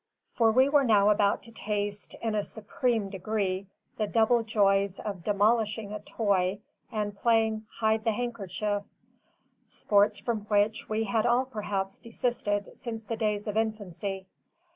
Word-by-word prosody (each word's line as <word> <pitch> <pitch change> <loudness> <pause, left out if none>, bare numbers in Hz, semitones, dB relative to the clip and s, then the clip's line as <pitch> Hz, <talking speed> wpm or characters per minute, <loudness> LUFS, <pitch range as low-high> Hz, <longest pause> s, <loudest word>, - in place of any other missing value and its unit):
For 225 -2 +4
we 260 +4 +5
were 285 0 +4
now 210 -4 +5
about 205 -1 +2
to 230 - -9
taste, 205 -2 -3
in 225 -1 0
a 210 - +1
supreme 220 0 -2
degree, 195 -1 -2 0.3
the 215 - 0
double 230 +2 +3
joys 200 -3 +2
of 195 -5 -5
demolishing 210 +1 +1
a 210 - -4
toy 200 -3 0 0.3
and 210 -2 -2
playing 220 0 +1
"Hide 220 0 0
the 225 - +2
handkerchief": 210 -3 -2 0.9
sports 205 0 +2
from 220 -1 -3
which 210 +1 +1
we 220 +1 0
had 220 +2 +1
all 245 +2 +3
perhaps 205 -5 -3
desisted 230 -3 -2
since 225 -3 -6
the 230 - -3
days 210 -2 -1
of 210 - -2
infancy. 200 -3 -2
215 Hz, 145 wpm, -28 LUFS, 200-225 Hz, 0.9 s, we